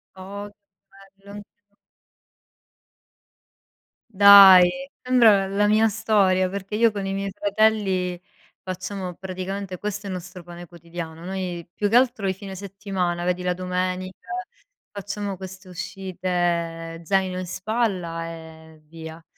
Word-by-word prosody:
Oh 200 +2 -8
che 205 - -26 0.7
bello! 200 - -12
Anch'io. 205 0 -20 2.4
Dai, 200 +5 +8
sembra 225 -6 +4
l 195 - -6
la 205 0 +3
mia 215 +1 +4
storia, 200 -4 +2
perché 200 +1 -5
io 225 0 +4
con 200 -2 -4
i 195 - -2
miei 195 0 -3
fratelli 200 -3 +1 0.4
facciamo 185 0 -5
praticamente 190 +1 -5
questo 205 +1 -5
è - - -5
il 185 - -3
nostro 180 0 -9
pane 175 0 -10
quotidiano. 170 -1 -9
Noi 180 -2 -4
più 205 - -1
che 225 - 0
altro 245 -5 +3
i 190 - +1
fine 195 0 -9
settimana, 190 -3 -3
vedi, 180 0 -1
la 180 0 0
domenica, 185 +1 -4 0.6
facciamo 200 -1 -5
queste 190 0 -10
uscite 175 -3 -3
zaino 190 -1 0
in 185 - -4
spalla 185 -5 -2
e 160 -1 -12
via. 160 +1 -11
190 Hz, 130 wpm, -23 LUFS, 180-200 Hz, 2.4 s, Dai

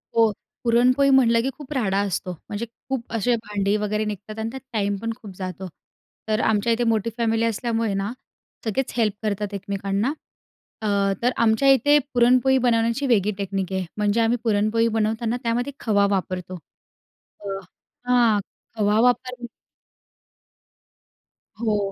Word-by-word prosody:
हो. 225 -2 +5 0.3
पुरणपोळी 255 +4 +4
म्हटलं 235 -4 +5
की 265 - -1
खूप 295 0 -8
राडा 200 -7 0
असतो 185 0 -3
म्हणजे 205 +6 -6 0.2
खूप 255 -4 -3
असे 235 +2 +2
भांडी 205 -1 0
वगैरे 210 +1 -1
निघतात 210 +1 -6
आणि 220 - -2
त्यात 265 0 -7
टाईम 205 -2 0
पण 230 0 -2
खूप 215 -4 -11
जातो. 185 0 -5 0.6
तर 215 0 +1
आमच्या 220 +2 +2
इथे 240 - 0
मोठी 230 -1 +1
फॅमिली 230 -1 +1
असल्यामुळे 230 -1 -1
ना, 195 +3 -2 0.5
सगळेच 230 +4 -1
हेल्प 220 -3 +2
करतात 210 -1 -2
एकमेकांना 200 +5 -2 0.7
अ, - - -4 0.4
तर 245 - +3
आमच्या 220 +5 +3
इथे 290 +3 +5 0.2
पुरणपोळी 250 +2 +4
बनवण्याची 235 +3 +2
वेगळी 210 -4 +3
टेक्नीक 195 -1 -3
आहे. 190 -1 -1
म्हणजे 210 +2 +2
आम्ही 230 +2 +2
पुरणपोळी 220 +1 +2
बनवताना 225 +2 0
त्यामध्ये 245 +4 -1
खवा 205 -3 +2
वापरतो, 185 -1 -2 0.8
अ, 205 - -14 0.6
हां. 240 -4 +4 0.4
खवा 210 0 +2
वापर 250 0 +1 2.2
हो. 210 -3 0
220 Hz, 140 wpm, -23 LUFS, 205-240 Hz, 2.2 s, हो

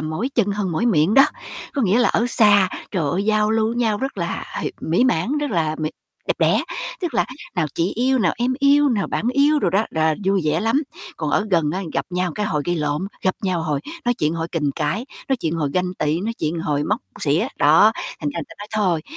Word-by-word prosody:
"mỏi 155 +11 -2
chân 230 -5 +2
hơn 195 -3 -2
mỏi 165 +9 0
miệng" 180 -2 +3
đó. 275 - +8 0.5
Có 275 - 0
nghĩa 205 +3 +3
là 245 - +4
ở 235 - +1
xa, 205 -5 +5 0.2
trời 165 -8 -1
ơi, 190 +5 -1
giao 215 0 +2
lưu 220 0 +1
nhau 225 -4 +1
rất 270 -6 -4
là, 170 -1 -3 0.2
h - - -3 0.2
mỹ 170 +10 +2
mãn, 250 - +1
rất 295 -1 -2
là 155 -4 0
mỹ 155 -1 -2 0.4
đẹp - - +1
đẽ, - - +3 0.4
tức 345 -8 -3
là - - +3 0.3
nào 175 -5 +1
"chị 170 +3 0
yêu", 260 +3 +2
nào 180 -8 +2
"em 245 +2 0
yêu", 285 +1 +4
nào 220 -6 0
"bạn 235 - -1
yêu" 290 +3 +4
đồ 225 - +1
đó, 200 +5 +2
rà 160 0 +1
vui 195 0 +2
vẻ 155 +2 +1
lắm. 225 +8 +1 0.3
Còn 155 -2 -2
ở 205 - +1
gần 165 -5 +2
á 190 - -2
gặp - - -1
nhau 180 -1 -1
cái 210 - -1
hồi 150 -7 -1
gây 175 0 0
lộn, 150 +3 -1 0.2
gặp 185 - +1
nhau 185 -4 0
hồi 150 -3 -1 0.2
nói 245 - +2
chuyện, 155 -7 0
hồi 165 0 -3
kình 150 -4 0
cãi, 170 +9 -1 0.2
nói 270 - +2
chuyện 165 -9 -2
hồi 150 -4 -1
ganh 180 +1 -1
tị, 155 +1 0
nói 220 +4 -2
chuyện 160 +2 -2
hồi 145 -3 -1
móc - - 0 0.2
xỉa, 150 +3 +1
đó, 160 +9 +6 0.3
thành 150 - -1
ra 170 - -2
ta - - -12
nói 205 - -8
"Thôi, 185 -7 +1
185 Hz, 240 wpm, -21 LUFS, 160-225 Hz, 0.5 s, đó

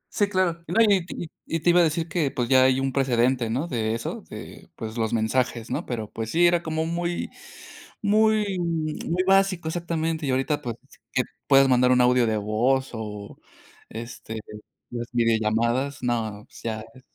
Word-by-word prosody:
Sí, 205 -2 +3
claro. 175 -4 0
No, 225 - +1
y 200 -5 +5
y 170 - -5 0.2
y 165 - -1
te 175 - +4
iba 175 - +5
a - - +6
decir 160 +1 0
que 160 -4 0
pues 125 -3 -2
ya 130 0 +5
hay 130 0 +3
un 135 -1 -1
precedente, 125 -2 +2
¿no?, 135 +9 -1
de 115 -4 -1
eso, 115 - -5
de, - - -10
pues 110 0 -6
los 110 -2 -1
mensajes, 115 +1 0
¿no?, - - -3
pero 110 -4 -3
pues 110 -1 -4
sí, 175 +5 +3
era 175 0 +4
como 160 -1 -2
muy 170 +1 -2 0.7
muy 210 -1 +3
muy 165 +1 -1
básico 195 -3 +3
exactamente, 160 -2 -2
y - - 0
ahorita 140 +3 0
pues 120 -3 -4 0.4
que 130 - +2 0.3
puedas 135 -1 +6
mandar 125 0 +4
un 125 0 +4
audio 125 0 +4
de 110 -1 +1
voz 120 +6 +1
o, 105 -2 -7 0.5
este, 115 -1 -7 0.5
las 120 -1 -5
videollamadas, 115 +3 +1
no, 110 -4 -2
pues - - -15
ya 110 -1 -3
e 130 - -15
130 Hz, 180 wpm, -25 LUFS, 115-170 Hz, 0.7 s, a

